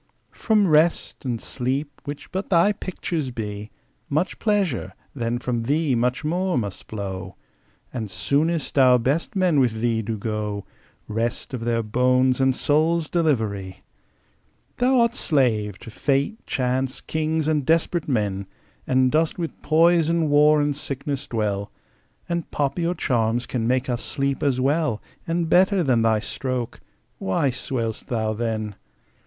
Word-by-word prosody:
From 215 -3 +2
Rest 155 -2 +2
and 120 -3 -1
Sleep, 135 +5 -3
which 145 -1 -7
but 190 +2 -3
thy 180 +2 +5
picture 170 -8 -3
be, 105 -2 -5 0.4
Much 155 +6 -1
pleasure, 190 - 0 0.2
then 120 -2 -1
from 120 -1 -2
thee 145 +4 +1
much 125 +1 0
more 180 +3 0
must 100 -5 -4
flow; 95 -3 -5 0.6
And 115 -5 -4
soonest 140 - 0
our 130 -1 +7
best 140 - -1
men 180 -6 +3
with 120 -4 +1
thee 115 -1 +1
do 110 0 -3
go 105 -1 -3 0.4
Rest 115 +4 -2
of 120 -3 -3
their 115 -1 0
bones 125 +3 +2
and 130 -1 +3
souls' 155 +3 +1
delivery! 110 - -1 1.0
Thou'rt 245 -2 +4
slave 115 - +1
to 115 - -11
fate, 140 - 0
chance, 130 +1 -1
kings, 155 0 -1
and 155 -2 +1
desperate 165 +2 +1
men, 100 -7 -1 0.4
And 130 0 +3
dost 160 +1 +1
with 170 -3 -5
poison, 165 0 +3
war, 150 +1 +6
and 145 -1 0
sickness 140 0 -4
dwell; 105 -3 -2 0.6
And 170 -1 -2
poppy 150 +4 -1
or 175 - 0
charms 120 -4 0
can 115 -3 -2
make 130 +1 +1
us 120 -3 -2
sleep 140 -1 -2
as 135 -3 +1
well 140 -3 +1 0.3
And 165 0 0
better 185 +2 +4
than 125 -6 +3
thy 110 -1 +2
stroke. 125 0 -3 0.4
Why 110 +8 +1
swell'st 115 -3 -3
thou 110 -2 -1
then? 110 -2 -2
130 Hz, 145 wpm, -23 LUFS, 115-160 Hz, 1.0 s, our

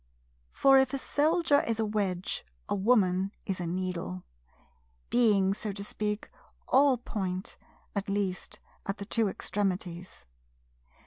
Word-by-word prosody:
For, 270 -1 +6
if 265 +1 +2
a - - 0
Soldier 295 +2 +3
is 225 -1 -2
a 220 - +2
wedge, 195 -4 -2 0.2
a - - -1
Woman 195 -3 +3
is 190 -2 -2
a 175 - -2
needle; 175 - -3 0.9
being, 205 -5 +4
so 210 +1 -4
to 200 0 -6
speak, 210 0 -3 0.4
all 270 -1 +5
point, 190 -5 -4 0.4
at 200 0 -2
least 195 -2 -2 0.3
at 195 +1 -2
the 200 - -6
two 225 +1 +2
extremities. 185 - -3
200 Hz, 130 wpm, -29 LUFS, 185-230 Hz, 0.9 s, For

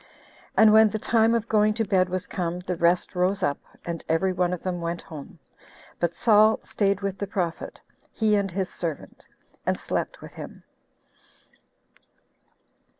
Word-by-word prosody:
And 220 -1 +7
when 220 0 +7
the 215 - -3
time 225 +1 +3
of 230 -1 -1
going 215 -1 +3
to 225 -1 0
bed 185 -2 +2
was 185 0 -3
come, 175 -3 -3
the 180 0 -3
rest 170 +1 +1
rose 185 +2 0
up, 145 - 0 0.3
and 170 -1 -4
every 185 +4 +2
one 180 -1 +1
of 180 - -4
them 180 -2 -3
went 170 0 -3
home; 155 -6 -10 0.6
but 170 -1 0
Saul 215 +1 +5
staid 200 -1 0
with 195 -1 -3
the 200 - -3
prophet, 175 -4 -3 0.3
he 215 -2 +2
and 200 -1 0
his 190 +1 -3
servant, 165 -4 -6 0.4
and - - -1
slept - - -3
with - - -12
him. - - -10
190 Hz, 160 wpm, -25 LUFS, 175-210 Hz, 0.6 s, And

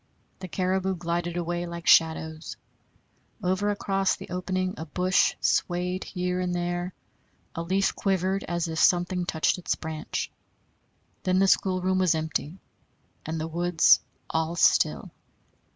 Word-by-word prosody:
The 185 - -6
caribou 190 +1 0
glided 175 0 -2
away 175 0 -2
like 170 0 -7
shadows. 160 0 +3 0.9
Over 190 +3 +1
across 195 -2 0
the - - -11
opening 185 +1 -2
a 160 +2 -7
bush 180 +4 +2
swayed 180 +1 0
here 180 -1 -2
and 180 -1 -1
there; 175 +1 -2 0.6
a 165 - -4
leaf 190 +3 +1
quivered 190 0 0
as 175 -1 -2
if 160 0 -3
something 180 0 +2
touched 160 +3 +1
its 180 - -1
branch. 160 -1 -4 0.9
Then 185 0 +1
the 195 +1 +4
schoolroom 185 0 +2
was 185 -3 +3
empty 160 +1 -3 0.7
and 160 0 -3
the 160 - -3
woods 170 0 +4 0.3
all 160 +1 -1
still. - - +3
180 Hz, 135 wpm, -26 LUFS, 170-185 Hz, 0.9 s, the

